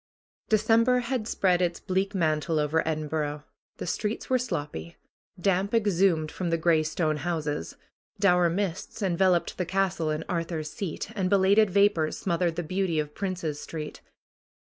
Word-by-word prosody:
December 230 +3 +4
had 240 -2 -2
spread 185 -4 +2
its 175 -1 0
bleak 195 +1 -1
mantle 160 -2 +1
over 150 +2 +2
Edinburgh. 150 -1 -2 0.3
The - - -5
streets 210 +8 -3
were 255 - +4
sloppy. 145 - -4 0.4
Damp 195 +3 +1
exhumed 185 -7 +2
from 180 -2 -3
the 165 - +1
gray 165 -1 +3
stone 155 0 -1
houses. 150 -2 -3 0.4
Dour 180 -3 +4
mists 190 +3 -3
enveloped 180 -2 +2
the 180 - 0
castle 190 -4 0
and 155 0 -2
Ar 170 -2 0
thur's 160 -3 -5
Seat 195 +2 -5
and 190 -3 0
belated 200 +2 +4
vapors 190 -5 +2
smothered 170 -2 0
the 175 - -2
beauty 185 0 -1
of 150 -1 -2
Princes 180 -6 -3
Street. 155 -2 -7
175 Hz, 150 wpm, -27 LUFS, 155-195 Hz, 0.4 s, December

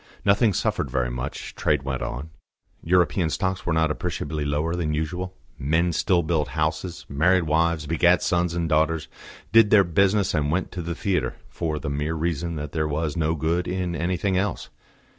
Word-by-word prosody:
Nothing 100 +3 +4
suffered 70 - -1
very 60 -1 -1
much; 60 +1 -5
trade 65 - 0
went 65 -1 -3
on; 70 +7 -5 0.5
European 90 0 +2
stocks 95 +3 -2
were - - +2
not 80 -1 +2
appreciably 75 0 -3
lower 75 +3 0
than 80 -4 -1
usual; 90 +4 -3 0.2
men 80 +5 +1
still 85 +2 +2
built 80 -2 0
houses, 80 +3 -2
married 85 +6 +3
wives, 80 0 +1
begat 85 +3 +3
sons 85 -1 +1
and 85 -1 0
daughters, 80 +1 +1 0.4
did 110 -1 +6
their 105 -2 +7
business 95 +3 +2
and 75 -3 +1
went 90 +3 -1
to 90 - -5
the 85 0 -4
theatre, 95 0 -1
for 80 -3 -3
the 75 - -5
mere 75 +3 -2
reason 85 +1 -2
that 75 -1 -5
there 80 -1 -1
was 75 0 -2
no 80 0 +1
good 85 +3 0
in 90 -1 -2
anything 90 +3 0
else. 100 +3 -2
80 Hz, 180 wpm, -24 LUFS, 75-90 Hz, 0.5 s, their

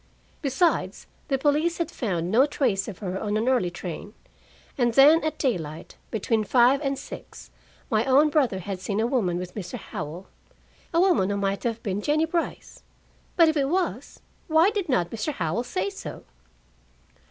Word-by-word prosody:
Besides, 300 +5 0 0.2
the 275 - +1
police 300 +5 +1
had 335 -3 -2
found 180 -7 -2
no 255 +6 +5
trace 240 -10 0
of 205 -5 -7
her 185 +1 -3
on 210 0 -1
an 225 +3 -1
early 250 -9 +2
train. 175 -1 -7 0.6
And 240 -2 +1
then 300 +4 +7
at 310 - -2
daylight, 165 - -3
between 220 0 0
five 250 +6 +4
and 275 -2 -1
six, - - -10 0.4
my 215 -1 +3
own 285 +3 +4
brother 265 -10 +2
had 190 0 -5
seen 195 +3 -2
a 225 - +2
woman 225 -9 0
with 180 0 -6
Mr. 180 -5 -6
Howell, 165 +6 -7 0.7
a 335 - +2
woman 350 - +3
who 200 - -1
might 195 0 -1
have 230 -1 -2
been 200 -1 -2
Jennie 305 +6 +2
Brice. 335 0 -4 0.5
But 335 -2 +6
if 315 - +2
it 275 -2 +1
was, 365 +2 -2 0.3
why 325 +4 +4
did 405 -6 -3
not 175 -10 +1
Mr. 230 +7 -3
Howell 175 - -1
say 195 -4 -2
so? - - -8
240 Hz, 175 wpm, -25 LUFS, 195-295 Hz, 0.7 s, then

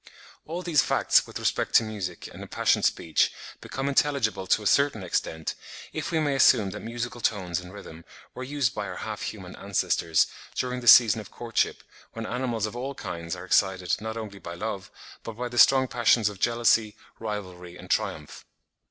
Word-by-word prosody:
All 170 +3 -4
these 165 -4 +3
facts - - +3
with - - -7
respect - - -1
to - - +7
music 100 -5 -5
and - - -10
impassioned - - +1
speech 80 - +1 0.3
become 135 +1 -4
intelligible 135 -9 +1
to 105 - +2
a - - -10
certain 140 -2 +2
extent, 80 -2 -2 0.4
if - - -3
we 165 - +1
may 145 -2 +1
assume 115 -7 +4
that - - -6
musical 120 +1 -5
tones 95 -6 -1
and 90 0 -11
rhythm 85 -4 -11 0.3
were 130 - -6
used 135 -5 -1
by - - -4
our - - -6
half - - -6
human - - -6
ancestors, 80 -1 +1 0.3
during 125 0 -2
the 120 - -7
season 115 -3 +8
of 105 - -13
courtship, 115 -1 -2 0.3
when 115 -1 -5
animals 120 -3 -2
of 110 - -6
all 135 +3 -4
kinds 85 -5 -5
are 90 0 -9
excited 95 -1 +2
not 110 +1 -5
only 105 -3 -7
by 85 -1 -8
love, 100 0 -5 0.3
but 115 - -7
by 125 +3 -4
the 120 0 -2
strong 130 -1 +6
passions 120 -3 +3
of 100 -2 -10
jealousy, 115 -2 +2 0.2
rivalry, 90 -5 -6
and - - -9
triumph. 75 -2 -2
110 Hz, 185 wpm, -26 LUFS, 95-125 Hz, 0.4 s, season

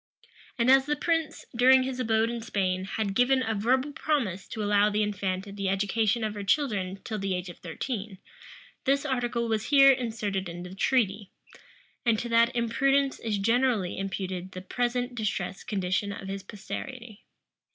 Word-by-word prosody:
And 240 +1 +4
as 270 +1 +5
the 295 - +1
prince, 325 +1 -1
during 260 +2 +6
his 260 0 -4
abode 225 -1 +2
in 235 -1 -4
Spain, 190 -4 -1
had 200 0 -2
given 260 +4 +3
a 220 - -1
verbal 255 +7 +1
promise 235 - -1
to 215 - -4
allow 205 0 +4
the 210 0 +1
infanta 200 -1 -2
the 200 -1 -2
education 210 +4 +1
of 215 -1 -1
her 205 -1 -5
children 195 -5 0
till 215 -1 -4
the 195 -1 -1
age 180 0 -4
of 175 - -11
thirteen, 200 +3 -5 0.7
this 275 +1 +2
article 240 -3 -1
was 220 -1 -1
here 275 -1 +7
inserted 220 -7 -2
in 175 +1 -7
the 180 +1 -8
treaty; 205 -2 +1 0.7
and 230 -2 +3
to 235 - -4
that 230 +1 +3
imprudence 270 +4 +1
is 220 -3 -1
generally 230 -2 +1
imputed 190 -1 -4
the 185 - -6
present 245 +5 -1
distressed 215 -4 -3
condition 195 0 -1
of 195 -1 -7
his 195 0 -4
posterity. 220 +3 -8
220 Hz, 170 wpm, -28 LUFS, 195-250 Hz, 0.7 s, here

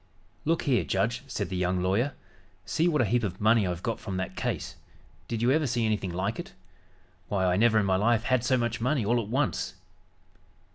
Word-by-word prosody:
"Look 165 +2 +1
here, 130 -5 +2
judge," 115 +5 0
said 130 - -3
the 95 - -3
young 90 0 0
lawyer. 110 +10 +1 0.5
"See 165 +2 +1
what 150 -7 +3
a - - +1
heap 120 +4 +1
of 95 -3 -3
money 110 -1 +4
I've 90 0 -4
got 115 -2 -2
from 95 -3 -5
that 95 0 -4
case. - - -3 0.5
Did 115 0 -2
you 125 - +4
ever 155 +1 +2
see 120 -1 0
anything 105 -4 -1
like 95 - -2
it? 180 +3 -7 0.7
Why, 95 -1 0
I 90 0 +3
never 110 +2 +4
in 105 - +3
my 95 -1 +2
life 110 +2 +2
had 130 -2 +1
so 130 +1 +2
much 120 -1 -1
money 130 -2 +1
all 120 +3 +2
at 105 - -7
once!" 130 -5 -1
115 Hz, 210 wpm, -28 LUFS, 95-125 Hz, 0.7 s, money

